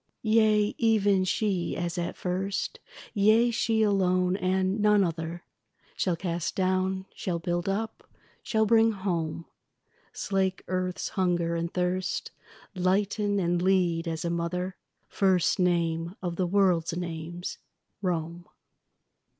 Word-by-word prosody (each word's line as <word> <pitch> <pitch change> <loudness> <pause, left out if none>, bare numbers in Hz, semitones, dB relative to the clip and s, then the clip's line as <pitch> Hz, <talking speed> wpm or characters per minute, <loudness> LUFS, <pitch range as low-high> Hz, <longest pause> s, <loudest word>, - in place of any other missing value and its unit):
Yea, 215 -1 +3
even 205 -4 +3
she 185 -2 -1
as 170 -1 -2
at 175 -1 -3
first, 190 +2 -2 0.3
Yea, 220 +3 +4
she 225 -1 +1
alone 185 -3 +2
and 190 +1 0
none 210 -1 +4
other, 165 0 -3 0.5
Shall 180 -3 0
cast 170 -1 -3
down, 190 0 0
shall 175 -3 -3
build 175 +2 -2
up, 220 +3 -4 0.3
shall 220 -1 +1
bring 225 +1 +4
home; 170 -5 -2 0.7
Slake 190 -1 -1
earth's 185 0 -2
hunger 175 -3 0
and 170 +1 -2
thirst, 180 +1 -1 0.4
Lighten, 200 +2 +1
and 175 -1 +1
lead 180 -3 +2
as 165 0 -3
a 170 - 0
mother; 180 +2 -2 0.3
First 190 -3 +2
name 170 -1 +1
of 175 -2 -3
the 180 0 0
world's 175 -3 +2
names, 170 0 -5 0.4
Rome. 175 -1 -3
185 Hz, 120 wpm, -28 LUFS, 175-200 Hz, 0.7 s, Yea